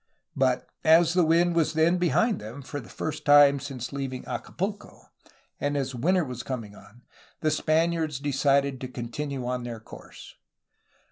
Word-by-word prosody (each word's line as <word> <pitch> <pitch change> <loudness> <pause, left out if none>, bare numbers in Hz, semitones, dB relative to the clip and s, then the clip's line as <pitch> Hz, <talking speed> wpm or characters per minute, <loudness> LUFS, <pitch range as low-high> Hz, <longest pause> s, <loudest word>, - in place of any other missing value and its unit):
But 130 -1 +1 0.2
as 165 +1 +5
the 180 -1 +4
wind 170 +2 +3
was 165 -2 +2
then 165 +3 +3
behind 175 - +1
them 115 +7 -8
for 145 +2 -6
the 120 - -12
first 155 - -5
time 145 -1 +6
since 135 -2 -6
leaving 135 -2 -4
Acapulco 205 +3 -5 0.6
and 145 0 -1
as 135 -1 -2
winter 175 +8 +1
was 125 -2 -6
coming 115 -6 -6
on, 105 +4 -17 0.4
the 155 - +1
Span 160 +3 +2
iards 160 -5 -2
decided 140 -1 +1
to 130 - -4
continue 130 +2 -5
on 125 0 -2
their 120 -2 -6
course. 110 - -13
140 Hz, 160 wpm, -26 LUFS, 125-160 Hz, 0.6 s, time